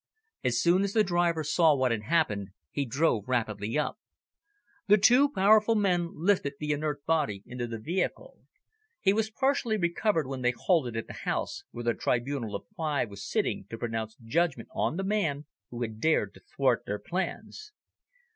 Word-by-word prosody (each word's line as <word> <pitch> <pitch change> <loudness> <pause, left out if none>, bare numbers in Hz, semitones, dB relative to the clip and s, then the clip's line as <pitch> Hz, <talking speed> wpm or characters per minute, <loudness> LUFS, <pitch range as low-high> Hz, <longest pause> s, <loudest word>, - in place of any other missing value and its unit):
As 120 -2 +1
soon 175 +7 +4
as 200 0 -1
the 220 - +4
driver 175 -3 +1
saw 155 0 +4
what 130 -2 +1
had 115 -2 -1
happened, 105 - 0 0.2
he 140 - -1
drove 125 -4 +1
rapidly 110 -2 -1
up. 150 +8 -1 0.9
The 210 +1 +7
two 250 +7 +5
powerful 215 -1 +4
men 180 -5 +1
lifted 170 -4 +1
the 150 0 -2
inert 145 -1 -2
body 145 -12 0
into 120 0 -5
the 115 -1 -5
vehicle. 185 - -3 0.6
He 195 -2 +3
was 220 +1 0
partially 265 -2 +1
recovered 170 -1 +1
when 130 -1 -5
they 125 0 +2
halted 130 -11 +1
at 115 - -3
the - - -9
house - - -3
where 120 - -7
the 120 0 +2
tribunal 120 -3 -1
of - - -6
five 150 - -1
was 100 0 -8
sitting 95 - -1
to 115 - -6
pronounce 110 -1 -4
judgment 160 +10 -1
on 165 - -1
the 195 - -1
man 175 -8 -1 0.2
who 120 0 -4
had 110 -2 -5
dared 160 +6 +2
to - - -15
thwart - - 0
their - - -2
plans. 430 0 -5
150 Hz, 175 wpm, -28 LUFS, 120-190 Hz, 0.9 s, The